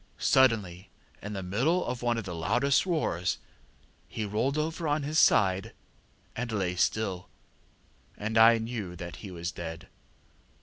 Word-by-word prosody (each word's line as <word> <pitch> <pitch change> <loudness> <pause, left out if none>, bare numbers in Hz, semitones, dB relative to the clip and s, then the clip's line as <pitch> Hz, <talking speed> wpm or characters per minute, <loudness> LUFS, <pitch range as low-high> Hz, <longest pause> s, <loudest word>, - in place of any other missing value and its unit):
Suddenly, 105 -8 +2 0.3
in 105 +1 -6
the 95 -2 -4
middle 130 - +1
of 125 0 -4
one 120 -1 +1
of 115 - -3
the 95 -2 -6
loudest 120 - +1
roars, 95 - 0 0.7
he 110 - -4
rolled 115 +8 -1
over 160 +2 -2
on 150 +1 +1
to 140 - -4
his 155 +1 +2
side 95 +3 +3 0.6
and 120 0 -3
lay 95 -4 -1
still, 95 -1 -1 0.9
and 110 +2 -3
I 115 +1 +7
knew 110 -6 -5
that 85 -2 -8
he 100 - -9
was 85 -1 -5
dead. 80 -1 -7
110 Hz, 155 wpm, -29 LUFS, 90-125 Hz, 0.9 s, I